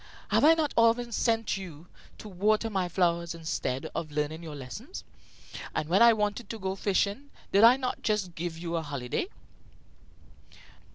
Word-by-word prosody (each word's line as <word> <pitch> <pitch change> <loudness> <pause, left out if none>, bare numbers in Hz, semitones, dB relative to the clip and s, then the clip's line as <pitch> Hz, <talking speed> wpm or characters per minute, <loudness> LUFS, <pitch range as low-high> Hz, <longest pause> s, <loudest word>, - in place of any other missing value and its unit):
Have - - +3
I 320 +2 +7
not 310 -3 -1
often 230 +1 +3
sent 225 -2 0
you 170 -5 -9 0.3
to - - -10
water 215 +4 +1
my 190 -3 -1
flowers 170 -1 0
instead 160 -5 -3
of 155 - -4
learning 150 +2 -2
your 160 -3 -8
lessons? 175 - -8 0.7
And 155 - -2
when 190 +5 +3
I 235 0 +9
wanted 210 +1 -1
to 225 - -5
go 190 0 -2
fishing, 200 +7 -1 0.2
did 200 +2 +5
I 240 +3 +8
not 255 -2 -3
just 210 -5 -1
give 170 0 -5
you 170 0 -3
a - - -1
holiday?" 140 - -3
195 Hz, 165 wpm, -28 LUFS, 165-225 Hz, 0.7 s, I